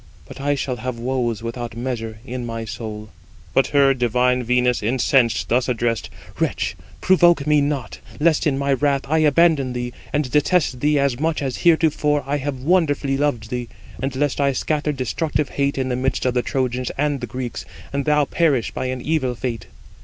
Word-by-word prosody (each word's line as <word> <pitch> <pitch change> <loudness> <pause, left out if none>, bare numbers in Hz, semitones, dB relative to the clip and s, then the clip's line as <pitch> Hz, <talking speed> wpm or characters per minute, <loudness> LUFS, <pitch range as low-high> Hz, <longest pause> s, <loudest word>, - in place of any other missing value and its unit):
But - - -10
I 145 +1 +1
shall 130 -2 -3
have 125 +1 -4
woes 120 -2 -2
without 115 0 -5
measure 115 -3 -4
in 125 -1 -5
my 115 -1 -4
soul." 105 0 -7 0.4
But 135 - +3
her, 140 -1 +4
divine 125 0 +1
Venus, 125 0 +1
incensed, 120 +1 +2
thus 125 +2 +2
addressed: 115 -1 -1 0.3
"Wretch, - - -1 0.3
provoke 175 -5 +4
me 150 -1 +4
not, 130 - -2 0.2
lest 160 0 +3
in 135 -3 +1
my 140 0 +1
wrath 140 0 +1
I 160 +3 +1
abandon 155 -3 +3
thee, 120 0 -4 0.2
and 145 -4 -1
detest 150 -2 +2
thee 150 +2 +2
as 140 -3 +1
much 160 -1 0
as 130 -2 -2
heretofore 155 -3 +2
I 140 +2 0
have 140 -2 -4
wonderfully 145 -5 +2
loved 135 -6 -1
thee, 125 -2 -3 0.3
and 135 0 -2
lest 145 +1 0
I 140 -1 +2
scatter 150 +2 -1
destructive 145 +3 -1
hate 140 0 -1
in 130 -1 -1
the 125 - 0
midst 130 +1 -1
of 125 - +2
the 125 - +2
Trojans 125 -1 -1
and 145 0 0
Greeks, 125 -2 -5 0.3
and 140 0 -1
thou 150 -1 +3
perish 140 -5 +1
by 130 - -3
an 130 0 -3
evil 140 -5 0
fate." 115 -5 -4
130 Hz, 185 wpm, -21 LUFS, 125-145 Hz, 0.4 s, her